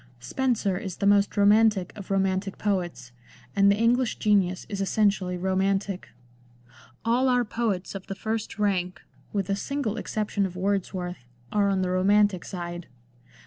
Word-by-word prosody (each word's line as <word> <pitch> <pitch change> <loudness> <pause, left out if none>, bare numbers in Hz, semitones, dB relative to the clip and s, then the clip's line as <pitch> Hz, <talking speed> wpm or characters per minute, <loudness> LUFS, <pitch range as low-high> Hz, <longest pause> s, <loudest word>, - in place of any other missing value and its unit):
Spenser 205 - 0
is 190 -5 -6
the - - -1
most 200 +1 +3
romantic 205 -2 +4
of 200 -3 -9
romantic 195 0 0
poets, 175 - -2 0.4
and 200 0 +5
the - - +3
English 235 +3 +2
genius 195 -4 +2
is 200 -2 -4
essentially 195 -2 +1
romantic; 190 +1 -1 1.0
all 250 +3 +3
our 245 -1 +3
poets 210 -5 -2
of 195 -1 -8
the 195 - -4
first 220 +2 -3
rank, 185 -3 -1 0.3
with 200 -2 -1
the 195 - 0
single 240 0 -2
excep 215 -1 -3
tion 200 -2 +1
of 180 - -11
Wordsworth, 185 -4 -2 0.3
are 205 -1 +2
on 190 -1 +1
the 180 - -1
romantic 200 0 +3
side. 175 -2 -6
200 Hz, 150 wpm, -26 LUFS, 185-210 Hz, 1.0 s, and